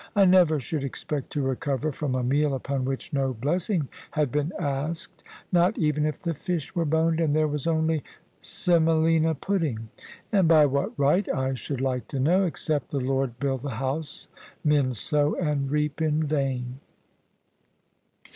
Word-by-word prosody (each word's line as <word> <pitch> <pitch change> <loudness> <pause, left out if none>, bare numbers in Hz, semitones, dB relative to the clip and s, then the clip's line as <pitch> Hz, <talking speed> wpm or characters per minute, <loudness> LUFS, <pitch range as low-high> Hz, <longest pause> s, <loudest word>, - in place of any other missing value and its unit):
I 200 -1 +6
never 180 -5 +5
should 140 +3 -3
expect 140 +1 -3
to 145 - -1
recover 140 +2 -1
from 140 -2 -2
a 130 - -1
meal 140 +3 +1
upon 135 0 -2
which 135 +6 -4
no 135 -2 0
bless 155 - -1
ing 170 -9 0 0.2
had 150 -5 0
been 150 +3 0
asked, 150 +1 -3 0.3
not 180 +3 +3
even 150 -2 +1
if 150 - -3
the 170 -2 -3
fish 165 0 -4
were 170 -3 0
boned 160 +1 +2
and 150 -2 +2
there 155 0 +3
was 150 0 -2
only 160 -2 +1 0.4
semolina 160 -1 +2
pudding. 145 - -2 0.4
And 195 -5 +4
by 155 -2 +6
what 140 0 -1
right, 145 +8 +2
I 130 0 -1
should 130 +2 -4
like 130 -3 -1
to 140 - -4
know? 180 +8 +3
Except 155 -4 -1
the 140 - -2
Lord 135 -2 -1
build 135 -2 -1
the 135 -4 -4
house, 135 +4 -3 0.4
men 145 -4 +2
sow 145 +7 +1
and 145 -5 -1
reap 150 +1 -1
in 155 0 +1
vain." 135 -4 -2
150 Hz, 165 wpm, -26 LUFS, 135-160 Hz, 0.4 s, I